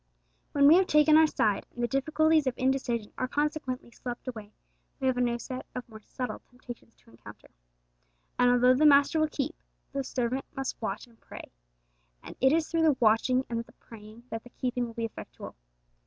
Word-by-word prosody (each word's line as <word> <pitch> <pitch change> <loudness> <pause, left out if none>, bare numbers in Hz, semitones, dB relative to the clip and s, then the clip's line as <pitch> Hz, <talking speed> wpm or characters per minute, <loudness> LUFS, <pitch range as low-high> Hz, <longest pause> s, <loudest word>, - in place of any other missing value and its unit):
When 280 -1 +4
we 320 +4 +8
have 375 0 +3
taken 300 0 +5
our 315 0 +7
side, 210 -8 0
and 240 - -4
the - - +2
difficulties 310 +3 +2
of 255 - 0
indecision 255 -4 -1
are 255 - 0
consequently 290 -3 -3
swept 245 +1 -8
away, 215 -4 -7 0.5
we 265 - -3
have 260 -1 +2
a 250 - -1
new 240 -1 +1
set 255 +2 -7
of 250 - -6
more 220 -2 -13
subtle 250 +3 -6
temptations 245 -2 -12
to - - -24
encounter. 115 - -15 0.9
And 245 - +5
although 245 +1 +5
the 270 +4 +1
Master 285 +3 +5
will 310 - +3
keep, 290 +1 -3 0.4
the 275 0 -2
servant 255 0 -2
must 270 -2 -4
watch 210 -2 -4
and 235 -2 -25
pray; - - -11 0.7
and - - -10
it 265 +1 +5
is 320 0 +1
through 330 -1 0
the 310 -5 +3
watching 245 +3 +3
and 230 -1 -3
the - - -21
praying 220 +1 -14
that 225 0 -5
the 245 - -14
keeping 245 0 -3
will 230 - -11
be 230 - -2
effectual. 225 - -9
255 Hz, 200 wpm, -28 LUFS, 235-280 Hz, 0.9 s, we